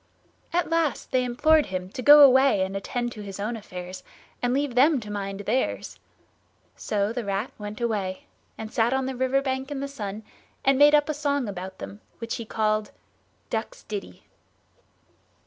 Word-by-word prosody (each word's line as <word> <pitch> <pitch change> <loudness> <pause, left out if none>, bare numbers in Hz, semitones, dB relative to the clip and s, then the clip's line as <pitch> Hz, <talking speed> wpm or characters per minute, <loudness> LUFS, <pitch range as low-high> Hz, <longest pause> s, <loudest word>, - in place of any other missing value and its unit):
At 345 0 0
last 330 -3 0
they 255 -1 +2
implored 300 +6 +3
him 185 -1 -4
to 255 - -6
go 290 +3 +9
away 265 -6 +6
and 190 +1 -4
attend 240 +4 -3
to 215 - -8
his 200 -1 -8
own 215 +4 -2
affairs 185 -4 -8 0.4
and 245 - +1
leave 275 0 0
them 275 +3 +4
to 210 -2 -8
mind 195 -1 -4
theirs. 230 +6 -2 0.8
So 205 +1 -1
the 245 -1 -3
Rat 200 +4 -2
went 210 +1 -6
away, 205 -6 -2 0.3
and 220 0 -7
sat 235 +2 +2
on 265 0 0
the 265 0 -3
river 260 +2 +1
bank 265 0 -2
in 290 -2 -4
the 280 - -3
sun, 215 -6 -6 0.4
and 270 0 +4
made 295 +1 +7
up 295 -1 +3
a 305 - -1
song 285 -3 -1
about 190 -1 -6
them, 205 +2 -9 0.2
which 230 +1 -4
he 230 - -6
called 215 -1 0 0.6
"DUCKS' - - -4
DITTY." 410 - -7
240 Hz, 180 wpm, -25 LUFS, 205-275 Hz, 0.8 s, go